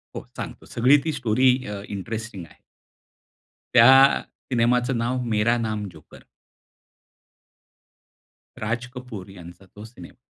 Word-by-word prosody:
हो. - - -4 0.2
सांगतो, - - -7
सगळी 130 +5 +4
ती 160 - 0
स्टोरी 130 -1 +2 0.2
अ, 100 -1 -6
इंटरेस्टिंग 100 -1 -6
आहे. - - -21 1.1
त्या 135 +3 +7 0.3
सिनेमाचं 125 +1 +1
नाव, 125 +2 -1
मेरा 115 +1 +1
नाम 110 -3 -3
जोकर. 80 -2 -16 2.4
राज 115 +3 -2
कपूर 125 -7 -9
यांचा 90 0 -13
तो 105 - -10
सिनेमा. 115 - -13
115 Hz, 110 wpm, -23 LUFS, 105-125 Hz, 2.4 s, त्या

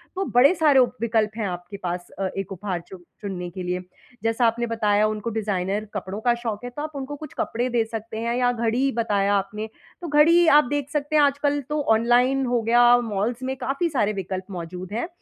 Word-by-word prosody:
तो 385 +1 -1
बड़े 270 +7 +7
सारे 300 -5 +4
उप 250 -1 +2
विकल्प 220 -2 +1
हैं 215 -3 -1
आपके 180 +2 -6
पास 175 0 -3
अ, 190 -1 0
एक 195 0 -4
उपहार 185 -2 -4
चुन 185 -2 -12 0.2
चुनने 185 -4 -5
के 180 +1 -7
लिए। 180 0 -2 0.4
जैसा 225 +2 +1
आपने 235 +1 0
बताया, 210 -2 +2
उनको 215 +1 -3
डिज़ाइनर 205 -2 -2
कपड़ों 195 0 -4
का 240 +1 +3
शौक 230 -2 -5
है, 245 - -4
तो 245 +4 -7
आप 305 +1 -4
उनको 280 +1 -5
कुछ 305 +1 -10
कपड़े 245 +2 -1
दे 235 -2 +2
सकते 220 0 -6
हैं 235 +1 -1
या 245 -1 +3
घड़ी 235 0 -1
ही 275 - +2
बताया 205 -2 +1
आपने, 205 +2 -2 0.3
तो 345 - -5
घड़ी 300 +2 +5
ही 345 - +4
आप - - +3
देख 285 -1 -3
सकते 295 +1 -2
हैं। 300 - +6
आजकल 285 +1 +1
तो 300 0 0 0.2
ऑनलाइन 250 +4 +3
हो 245 -1 +1
गया, 240 +2 +5
मॉल्स 230 +2 -2
में 260 +1 -2
काफ़ी 275 +6 -1
सारे 215 -8 0
विकल्प 190 -1 -4
मौजूद 180 +1 -7
हैं, 235 +9 -2
230 Hz, 220 wpm, -24 LUFS, 200-260 Hz, 0.4 s, बड़े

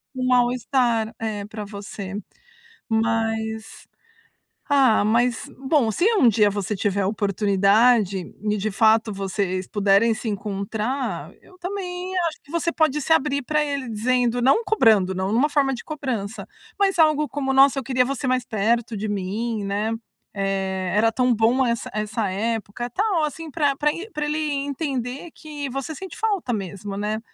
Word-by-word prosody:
um 255 0 -1
mal-estar, 245 -2 +2
é, 210 -2 -3
pra 215 0 -7
você. 200 -1 -7 0.7
Mas, 225 0 -1 0.8
ah, 265 -8 +4
mas, 235 +4 +1
bom, 265 -4 +2
se 215 - -1
um 275 - +5
dia 210 -2 +4
você 205 +1 -2
tiver 200 0 0
a 190 - +1
oportunidade 200 +1 +3 0.2
e, 210 0 0
de 210 +1 -2
fato, 220 +1 +3
vocês 190 -1 -2
puderem 205 +2 +3
se 230 - -6
encontrar, 205 - -3
eu 370 - -19
também 365 0 -4
acho 315 - -14
que 285 - -24
você 335 0 0
pode 310 -3 +1
se 320 - +2
abrir 285 -3 +1
pra 300 +3 +1
ele 280 -3 -3
dizendo 245 +2 +1
não 275 - +4
cobrando, 220 - +4
não 190 +2 -2
numa 265 +7 +3
forma 280 -2 +2
de 245 - -6
cobrança, 250 -9 -4 0.3
mas 390 -2 +2
algo 305 -2 +4
como: 270 -2 -2
"Nossa, 275 +1 +6
eu - - -6
queria 255 -1 +2
você 275 +1 -3
mais 255 -1 +1
perto 225 +1 0
de 215 +2 -3
mim, 205 +3 -2
né". 205 +3 -1 0.4
Eh, 190 -2 -2
"era 225 +2 +4
tão 250 +1 +2
bom 235 +4 +3
essa 235 -1 -2
essa 215 0 -2
época", 225 +3 -3
tal, 375 - +1
assim, 315 +1 -4
pra 290 -2 +1
pra 300 +1 +2
e 390 +6 -7
pra 300 0 -3
ele 300 +1 -1
entender 275 0 -3
que 295 -3 -6
você 275 +4 -4
sente 380 +5 -8
falta 410 - -1
mesmo, 200 0 -5
né. 210 +1 -2
230 Hz, 160 wpm, -23 LUFS, 210-280 Hz, 0.8 s, Nossa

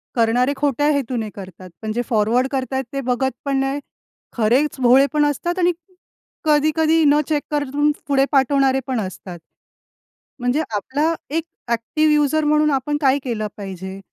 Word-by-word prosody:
करणारे 245 +3 +2
खोट्या 290 +1 0
हेतूने 250 -6 -2
करतात, 185 -2 -10
पण 220 - -3
जे 240 - 0
फॉरवर्ड 230 +3 +2
करत 265 -1 -3
आहेत 265 0 0
ते 275 - -2
बघत 255 +1 0
पण 275 -1 0
नाही. 270 +1 -1 0.6
खरेच 255 +7 +2
भोळे 255 +3 +6
पण 300 -1 +3
असतात 345 +5 -1
आणि 355 0 +3 0.7
कधी-कधी 310 +2 +3
न 290 +1 +5
चेक 295 -2 0
करून 290 0 +1 0.2
पुढे 275 -1 +3
पाठवणारे 270 -1 +3
पण 255 -3 -1
असतात. 185 -2 -7 1.0
म्हणजे 245 +5 0
आपला 290 +10 0 0.2
एक 320 +2 -1 0.3
एक्टिव 235 +7 +1
यूजर 300 +1 +2
म्हणून 300 0 +3
आपण 285 +2 0
काय 275 0 +3
केलं 225 -4 -2
पाहिजे? 190 -1 -7
270 Hz, 155 wpm, -20 LUFS, 240-295 Hz, 1.0 s, भोळे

